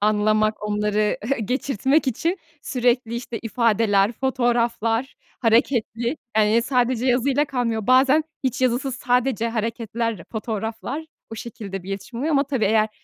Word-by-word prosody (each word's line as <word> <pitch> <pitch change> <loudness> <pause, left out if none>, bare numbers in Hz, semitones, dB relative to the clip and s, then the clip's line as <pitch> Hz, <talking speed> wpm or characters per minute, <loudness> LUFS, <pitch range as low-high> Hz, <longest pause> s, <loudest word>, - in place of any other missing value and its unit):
anlamak, 215 +1 +2
onları 210 0 0 0.3
geçirtmek 270 +4 +1
için 330 - 0 0.2
sürekli, 245 -2 0
işte, 235 -1 -5
ifadeler, 220 -2 +2
fotoğraflar, 240 -1 0 0.3
hareketli, 235 +2 +1 0.2
eee, 220 +2 +4
sadece 250 -1 +1
yazıyla 265 +3 +2
kalmıyor. 235 -6 -2
Bazen 270 +4 +5 0.2
hiç 260 +1 -1
yazısız, 255 +1 +1
sadece 245 -3 +1
hareketler, 230 -2 -2
fotoğraflar, 225 +7 -4 0.3
o 225 - -5
şekilde 205 -5 -7
bir 185 - -11
iletişim 200 +5 -6
oluyor 305 +5 0
ama, 280 0 +3
tabii, 265 -5 -1
eğer, 215 +1 +3
235 Hz, 125 wpm, -23 LUFS, 215-260 Hz, 0.3 s, Bazen